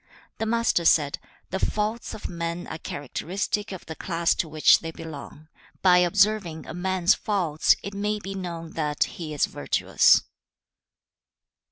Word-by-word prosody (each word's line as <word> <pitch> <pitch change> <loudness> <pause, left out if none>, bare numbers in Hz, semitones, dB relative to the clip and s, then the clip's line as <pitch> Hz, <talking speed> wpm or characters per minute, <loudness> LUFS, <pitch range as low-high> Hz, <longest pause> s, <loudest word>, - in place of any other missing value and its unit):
The 225 - -1
Master 230 -6 +2
said, 150 -3 +3 0.3
'The 190 - -1
faults 215 +4 -2
of 215 - -6
men 170 0 -4
are 160 - -7
characteristic 190 - -3
of 190 - -8
the 160 - -6
class 170 +1 0
to 165 - -2
which 155 0 +5
they 165 - -6
belong. 155 -1 -9 0.4
By 180 -1 +6
observing 180 -2 +2
a - - -7
man's 185 +1 +2
faults, 175 -8 +1
it 200 - -6
may 210 +1 -1
be 195 -1 -6
known 170 -4 -6
that 150 -2 0
he 160 -3 -7
is 150 - +2
virtuous.' - - +3
175 Hz, 150 wpm, -25 LUFS, 160-200 Hz, 0.4 s, By